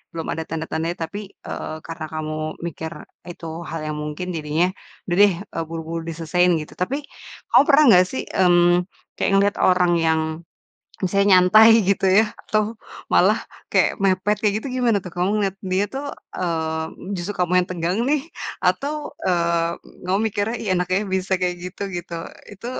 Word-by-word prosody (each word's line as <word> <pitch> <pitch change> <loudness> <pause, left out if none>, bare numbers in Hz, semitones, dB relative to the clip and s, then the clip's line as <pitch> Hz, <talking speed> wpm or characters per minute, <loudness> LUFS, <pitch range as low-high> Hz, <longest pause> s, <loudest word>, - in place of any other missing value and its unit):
belum 165 -1 -4
ada 160 - -4
tanda-tandanya 165 +2 -3
tapi, 165 +5 -5 0.3
eee, 155 - -5
karena 165 -1 -5
kamu 155 0 -3 0.3
mikir 160 0 -6 0.4
itu 170 - -11 0.2
hal 165 - -4
yang 150 - -5
mungkin 150 +4 -5
jadinya, 155 +2 +1 0.4
"Udah 175 - -1
deh," 205 -2 +6 0.2
eee, - - -1
"buru-buru 165 0 -4
diselesain." 170 +2 +1
Gitu. 150 - -10
Tapi, 255 +10 0 0.5
kamu - - +7
pernah 305 +1 +6
nggak 180 +1 +6
sih, 260 - -3 0.2
mmm, 175 -1 +4 0.3
kayak - - +1
ngeliat 200 +1 +3
orang 180 -1 +4
yang 160 0 +3 0.8
misalnya 200 +1 +5
nyantai, 215 +5 +7 0.2
gitu 200 -1 +2
ya, 220 - +6 0.2
atau, 215 0 +1 0.5
malah - - +5 0.3
kayak - - +4
mepet, 195 +2 +2
kayak 210 -2 +2
gitu 245 - -6
gimana, 230 -3 +3
tuh? 180 - -8
Kamu 180 +1 0
ngelihat 195 -2 -1 0.2
dia 190 +2 +2
tuh, 275 +2 -3 0.3
eee, 160 +2 -3
justru 185 +3 -4
kamu 180 -1 0
yang 180 - -7
tegang 175 +2 -1
nih, 295 0 +2 0.5
atau, 285 +2 +1 0.3
eee, 170 -1 +1 0.3
kamu 185 +2 +1
mikirnya, 220 +2 -1
"Ih, 210 - -2
enak 180 0 0
ya 195 - +2
bisa 190 0 -1
kayak 180 -1 0
gitu." 185 - -9
Gitu, 175 0 -6 0.4
itu 205 +4 -10
180 Hz, 165 wpm, -22 LUFS, 165-200 Hz, 0.8 s, kamu